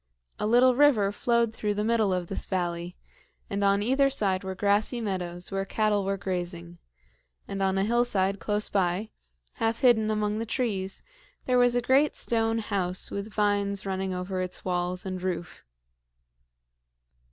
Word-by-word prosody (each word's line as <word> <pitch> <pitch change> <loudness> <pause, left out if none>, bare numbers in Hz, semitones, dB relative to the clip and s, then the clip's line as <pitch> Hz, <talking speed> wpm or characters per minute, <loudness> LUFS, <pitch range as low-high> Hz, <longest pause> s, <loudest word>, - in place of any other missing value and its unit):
A 210 - 0
little 245 +3 +5
river 245 -8 +4
flowed 235 +1 +1
through 210 -2 -2
the 210 - -1
middle 220 -3 +2
of 180 -1 -1
this 195 - -5
valley, 175 -1 -2 0.6
and 200 0 -1
on 200 0 +3
either 270 +4 +3
side 200 -8 0
were 190 0 -4
grassy 205 +5 +1
meadows 180 -5 -4
where 195 0 -1
cattle 210 0 0
were 195 0 -1
grazing; 175 -2 -5 0.7
and 195 0 -4
on 190 0 +1
a 195 - +2
hillside 205 -4 +1
close 210 0 -1
by, 190 +2 0 0.5
half 225 0 -1
hidden 220 -4 +4
among 210 0 0
the 225 - -2
trees, 205 -6 -2 0.4
there 250 -1 +3
was 245 0 +4
a 245 - +2
great 270 +5 +3
stone 225 -1 +1
house 190 -4 -2
with 200 +2 -5
vines 200 -2 0
running 190 0 -2
over 185 +1 -3
its 185 0 -5
walls 180 0 -2
and 185 -1 -4
roof. 180 -1 -4
200 Hz, 160 wpm, -27 LUFS, 185-225 Hz, 0.7 s, little